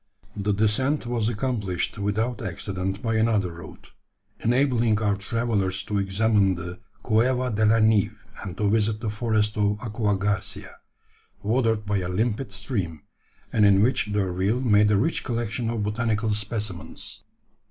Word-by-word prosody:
The 105 0 -1
descent 110 +8 +1
was 120 -2 0
accomplished 105 -5 -2
without 110 +5 -1
accident 95 0 -3
by 115 -1 +1
another 110 -5 +2
route, 85 0 -12 0.5
enabling 120 -3 +2
our 105 -2 +1
travellers 100 -3 -1
to 100 +1 -1
examine 100 0 +2
the 90 +3 -7 0.2
Cueva 125 +2 +2
de 110 0 +2
la 110 +1 +5
Nieve, 110 -1 +3 0.3
and 95 -2 -6
to 105 - +1
visit 105 0 +2
the 110 -2 -3
forest 110 -2 0
of 105 0 +1
Aqua 105 -3 -1
Garcia, 100 0 -3 0.7
watered 110 -1 +1
by 105 0 0
a 90 -1 -3
limpid 110 +6 -1
stream, 90 - -3 0.5
and 110 - +3
in 100 -1 +6
which 120 -3 +1
D'Urville 100 +3 0
made 105 -4 +4
a 105 - +4
rich 160 +11 0
collection 115 -1 -2
of 115 -2 -2
botanical 110 +1 0
specimens. 105 -3 -5
105 Hz, 145 wpm, -25 LUFS, 100-115 Hz, 0.7 s, in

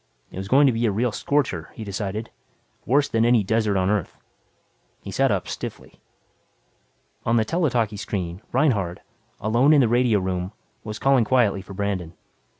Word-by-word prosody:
It - - -10
was 95 - -5
going 140 +6 +5
to 130 - +4
be 115 +1 +1
a - - +1
real 115 +4 0
scorcher, 110 - -1
he 110 - -7
decided; 105 +2 -4 0.6
worse 140 +2 +3
than 115 0 +1
any 120 -2 +4
desert 110 0 +1
on 95 0 +1
Earth. 105 -5 -2 0.9
He - - -7
sat - - +2
up - - -1
stiffly. - - -7 1.2
On 115 - +1
the 110 -1 +3
tele 165 +5 +1
talkie 110 -4 -1
screen, 95 -3 -4
Reinhardt, 110 - +1 0.4
alone 120 +8 +3
in 145 - +6
the 125 - +4
radio 120 -1 +3
room, 95 +1 -3 0.3
was 105 -1 -6
calling 135 -3 +3
quietly 110 -5 +2
for 95 0 -11
Brandon. 95 -4 -3
110 Hz, 170 wpm, -23 LUFS, 100-125 Hz, 1.2 s, in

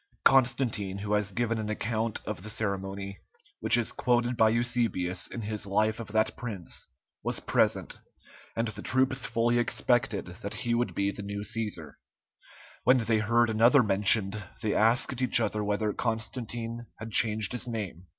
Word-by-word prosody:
Constantine, 120 -7 +3
who 105 +1 -3
has 105 -1 +1
given 115 +1 -1
an 105 -1 -4
account 110 +1 -2
of 105 -3 -5
the 105 - -7
ceremony, 100 -2 -3 0.4
which - - +6
is 120 - 0
quoted 120 0 +1
by 110 -1 +4
Eusebius 115 -6 0
in 120 - -6
his 105 -1 -2
life 110 +3 +1
of 115 - -6
that 110 +1 0
prince, 105 -8 -5 0.3
was - - -1
present, - - 0 0.6
and 115 +1 0
the 105 -1 -7
troops 130 +1 +1
fully 120 +1 +1
expected 120 -3 +1 0.2
that 100 - -5
he 120 -1 -2
would 120 +1 -1
be 100 0 0
the 105 - -8
new 100 0 -5
Cæsar; 105 -7 -3 0.9
when 130 +1 +5
they 115 -2 +1
heard 115 +2 +2
another 120 +5 +5
mentioned, 105 0 +3 0.2
they 105 - 0
asked 120 +3 +2
each 125 -2 +4
other 110 -2 -1
whether 105 +1 -1
Constantine 115 0 -4
had 110 0 -8
changed 110 -1 +3
his 125 0 -3
name. 95 -6 -5
110 Hz, 160 wpm, -28 LUFS, 105-120 Hz, 0.9 s, which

